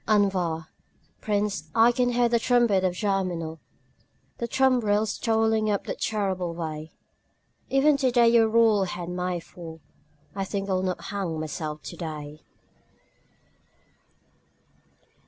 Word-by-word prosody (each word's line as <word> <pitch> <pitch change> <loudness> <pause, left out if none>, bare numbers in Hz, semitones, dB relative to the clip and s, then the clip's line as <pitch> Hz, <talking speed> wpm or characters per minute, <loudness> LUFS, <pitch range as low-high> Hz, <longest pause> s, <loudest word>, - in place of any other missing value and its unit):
Envoi 190 -6 +1 0.6
Prince, 205 -1 -1
I 230 +1 +6
can 245 0 +1
hear 240 0 +3
the 235 0 +2
trumpet 235 -6 +3
of 180 -1 0
Germinal, 180 -5 -2 0.8
The 235 - -2
tumbrils 220 -5 +2
toiling 220 -1 +2
up 200 -1 0
the - - -4
terrible 190 -5 -2
way; 155 -2 -5 0.8
Even 280 +2 +4
today 245 -3 +3
your 230 -1 +5
royal 220 -3 +4
head 175 -1 -5
may 180 0 -2
fall 165 -1 -11 0.6
I 195 - -1
think 195 0 -3
I 195 - 0
will 185 - +1
not 185 -1 -2
hang 185 -6 -3
myself 155 0 -5
today. 155 -2 -7
200 Hz, 120 wpm, -26 LUFS, 175-225 Hz, 0.8 s, I